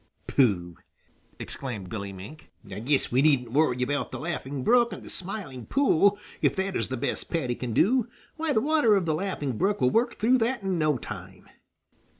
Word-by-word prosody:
"Pooh!" 90 -10 +1 0.6
exclaimed 115 -9 -6
Billy 100 0 -5
Mink, 100 +12 -11 0.2
"I 100 - -5
guess 135 +5 +1
we 125 +2 +3
needn't 135 -6 +3
worry 125 -3 +2
about 145 +3 -1
the - - -5
Laughing 145 -5 -4
Brook 240 - +4
and - - -8
the - - -10
Smiling 180 - -5
Pool, 205 - +3 0.2
if - - +2
that 190 0 -2
is - - 0
the 130 - -3
best - - -3
Paddy 135 -7 -1
can 120 0 -5
do. 235 - +3 0.3
Why, 320 -1 -1
the 220 - +2
water 295 -6 +4
of 190 -3 +1
the 160 - +1
Laughing 150 - -3
Brook 205 +1 +1
will 125 - +3
work 235 +1 +1
through 250 +4 +3
that 235 -1 0
in 190 -3 -1
no 155 -3 +2
time." - - -9
155 Hz, 190 wpm, -27 LUFS, 125-210 Hz, 0.6 s, Brook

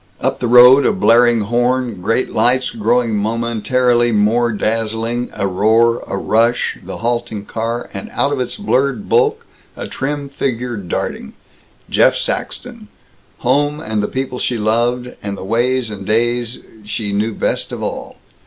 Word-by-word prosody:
Up 130 - -1
the 120 - -1
road, 125 +3 +8
a - - +3
blaring 120 - +4
horn, 120 -1 0
great 115 +7 0
lights 125 +2 +1
growing 115 +1 +1
momently 120 +3 +1
more 115 +3 +2
dazzling, 115 +2 -2
a 100 - -3
roar, 110 +5 +2
a 100 - -3
rush, 115 +4 +1
the - - -7
halting 120 -3 -2
car, 115 +2 -3
and 220 - -6
out 145 - +1
of 140 - -2
its 125 - -3
blurred 140 -1 0
bulk, 460 0 +2 0.3
a - - -5
trim 140 +1 -3
figure 125 -3 -3
darting 90 -8 -4 0.5
Jeff - - +3
Saxton - - -4 0.5
home 145 +4 +1
and 110 -7 -2
the 105 - -1
people 130 -1 -4
she 120 - -1
loved, 120 +3 0
and 100 -1 -5
the - - -7
ways 120 +2 0
and 100 -2 -7
days 120 +3 -1 0.2
she 105 0 -4
knew 105 +2 -1
best - - -2
of - - -5
all. - - -5
120 Hz, 155 wpm, -17 LUFS, 110-125 Hz, 0.5 s, road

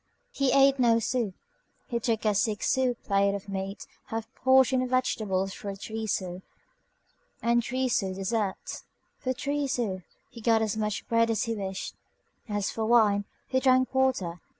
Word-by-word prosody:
He 275 - +1
ate 275 0 +5
no 235 -2 +5
soup. 230 -4 -1 0.5
He 235 -2 -2
took 225 -2 -1
a 210 - +3
six 210 +1 +1
sou 260 -2 +2
plate 200 -2 +1
of 200 0 -7
meat, 195 0 -5 0.2
a - - -25
half 225 0 -5
portion 260 0 +4
of 255 - -2
vegetables 200 -7 0
for 200 -1 -6
three 220 +2 -5
sous, 185 -3 -2 1.0
and 235 0 +2
a - - +2
three 255 +3 -1
sou 195 -6 0
dessert. 195 +1 -2 0.4
For 255 - -1
three 285 +2 -2
sous 220 -8 -1 0.3
he 235 - -11
got 225 0 +3
as 215 -2 -1
much 215 -1 -2
bread 230 0 +3
as 225 - +1
he 230 - -1
wished. 195 -2 -4 0.6
As 205 -1 -1
for 225 - -3
wine, 215 -3 +4 0.2
he 260 - +1
drank 255 -1 +3
water. 220 -11 +1
225 Hz, 175 wpm, -28 LUFS, 200-255 Hz, 1.0 s, ate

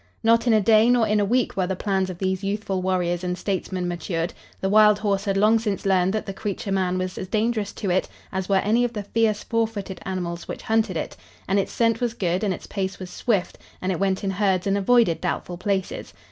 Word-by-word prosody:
Not 230 +2 +4
in 235 - +5
a 215 - +5
day 220 +2 +5
nor 245 -2 +4
in 210 0 +2
a 205 - +2
week 245 +3 +1
were 185 -2 0
the 190 - -1
plans 190 -1 0
of 180 - -6
these 190 +1 -1
youthful 195 -1 -2
warriors 180 -1 0
and 180 0 -2
statesmen 185 -2 -2
matured. 170 -1 -3 0.3
The 190 - -1
wild 210 +1 +6
horse 200 -1 -1
had 195 -1 0
long 215 +3 +4
since 210 -4 -3
learned 190 -1 +3
that 215 - -2
the 195 - -5
creature 200 0 -4
man 185 -1 +1
was 185 0 -3
as 185 - -5
dangerous 215 0 0
to 195 - -2
it 185 - +1 0.2
as 190 0 -3
were 195 - +3
any 215 +5 +3
of 240 -1 -1
the 210 -3 -4
fierce 215 0 0
four 230 -1 +1
footed 200 -4 -7
animals 175 -2 -4
which - - -6
hunted 220 -5 +1
it, - - -4 0.3
and 195 +2 +2
its 195 - -2
scent 230 -1 +1
was 240 -1 -1
good 180 -1 -1
and 205 - +1
its 185 - -5
pace 195 -1 -3
was 185 -1 -8
swift 205 -7 -1 0.2
and 185 - -1
it 180 - -2
went 195 0 0
in 195 - 0
herds 190 -2 +1
and 195 0 +1
avoided 200 -3 +3
doubtful 175 -1 -3
places. 195 -1 -2
195 Hz, 240 wpm, -24 LUFS, 185-215 Hz, 0.3 s, wild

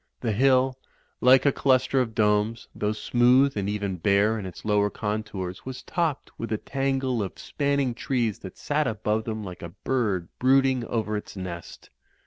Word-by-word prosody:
The 115 - 0
hill, 130 +3 +3 0.4
like 130 +2 +6
a 140 - +5
cluster 130 0 +2
of 115 -3 -3
domes, 105 +1 +1
though 105 - -1
smooth 125 +5 +3
and 100 -1 -1
even 100 -3 -2
bare 100 +5 +2
in 95 - -5
its 90 - -10
lower 105 -1 +2
contours 105 -3 -4
was 130 -1 -7
topped 165 -6 -2
with 115 - -4
a 110 - +1
tangle 135 -1 -1
of 95 - -5
spanning 140 -3 -1
trees 120 -3 -1
that 95 - -10
sat 150 -1 0
above 110 0 -1
them 110 -1 -4
like 90 -3 -8
a 85 - -6 0.2
bird 105 -10 0
brooding 130 -1 +3
over 110 -2 -2
its 105 - -6
nest. 90 -2 -8
110 Hz, 170 wpm, -26 LUFS, 105-130 Hz, 0.4 s, like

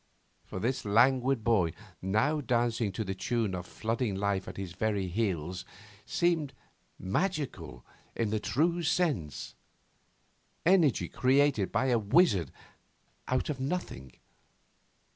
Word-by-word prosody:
For - - -7
this 125 +6 -1
languid 125 +3 +3
boy, 100 -8 +2 0.3
now 110 +11 +1
dancing 115 -4 0
to 110 - -2
the 95 -2 -3
tune 110 0 -1
of 90 -1 -5
flooding 115 -1 -2
life 100 -1 -1
at - - -8
his 95 -3 -5
very 100 -1 -1
heels, 90 -3 -2 0.4
seemed 165 -5 0 0.4
magical 135 - -3 0.3
in 110 -3 -1
the 110 - 0
true 165 - +1
sense: 145 - -1 1.1
energy 160 - +4
created 130 - +2
as - - -28
by 125 +5 +2
a 120 -2 +3
wizard 105 - +3 0.8
out 130 +3 0
of 135 - -5
nothing. 130 - -4
115 Hz, 125 wpm, -30 LUFS, 95-135 Hz, 1.1 s, energy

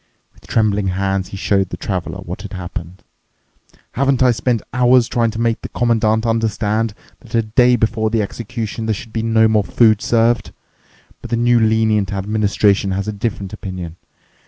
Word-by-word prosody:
With - - -21
trembling 105 -3 +1
hands 95 0 -1
he 100 - -8
showed 95 -1 +1
the - - -6
Traveler 95 0 -4
what 90 -1 -7
had 105 -1 -9
happened. 90 -1 -7 0.9
"Haven't 135 -1 +1
I 125 - +5
spent 120 0 -1
hours 125 -1 +4
trying 120 -2 +1
to 110 0 -6
make 115 -1 0
the - - -7
Commandant 110 -2 +1
understand 110 -1 0 0.2
that 120 -2 -8
a 115 - +3
day 120 +3 +3
before 110 -1 0
the 110 -1 +1
execution 115 +1 -5
there 110 - +1
should 110 +2 -10
be 115 - -1
no 110 0 +3
more 110 -2 +2
food 110 0 +3
served. 115 0 +1 0.7
But - - -9
the 120 - 0
new 120 0 +3
lenient 110 -3 +2
administration 100 0 +1
has 100 +1 -3
a 105 - -2
different 100 -2 -4
opinion. 90 -5 -6
110 Hz, 175 wpm, -18 LUFS, 100-115 Hz, 0.9 s, I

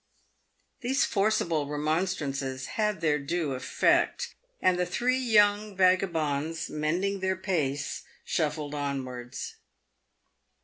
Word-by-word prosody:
These 265 +2 +2
forcible 195 -8 +1
remonstrances 145 -3 -1
had 210 -5 0
their 150 -2 +2
due 155 +1 -1
effect, 480 - +1 0.3
and 180 -1 +3
the 180 - +2
three 250 +8 +1
young 210 -4 +3
vagabonds, 165 -5 +1
mending 175 +6 0
their 190 0 0
pace, 145 -7 -1 0.2
shuffled 150 -2 -1
onwards. 130 -4 -4
165 Hz, 95 wpm, -28 LUFS, 145-195 Hz, 0.3 s, and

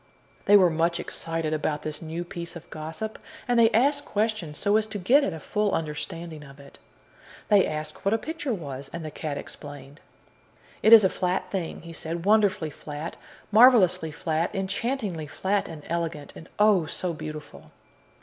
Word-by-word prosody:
They 205 - +8
were 180 -3 +5
much 170 +2 +1
excited 165 -1 -3
about 150 -1 -1
this 150 -1 -4
new 165 +1 -4
piece 170 0 -7
of 170 - -10
gossip, 160 +8 -6 0.3
and 245 -1 +3
they 225 -1 +7
asked 285 +6 +2
questions, 210 - -2
so 205 +1 +2
as 220 0 0
to 215 - -5
get 245 +10 +4
at 195 - 0
a 160 - -6
full 210 +5 -1
understanding 160 0 -5
of 140 -1 -14
it. 140 0 -15 0.7
They 205 -2 +5
asked 155 0 -5
what 195 - +2
a - - +2
picture 300 +2 -4
was, 140 - -5
and 170 -1 -6
the 155 - -5
cat 145 -2 -4
explained. 145 0 -10 0.8
"It 220 - +4
is 225 -2 +11
a - - +6
flat 180 0 -2
thing," 175 -5 -4
he 170 0 -9
said; 165 +1 -5
"wonderfully 205 -7 +3
flat, 150 +3 -7 0.4
marvelously 200 -8 +6
flat, 160 +1 -1
enchantingly 195 - -2
flat 195 +6 -1
and 155 -3 -9
elegant. 165 -3 -3
And, 165 - -11
oh, 205 -6 +4
so 175 +3 -3
beautiful!" 155 -1 -8
170 Hz, 175 wpm, -26 LUFS, 155-205 Hz, 0.8 s, is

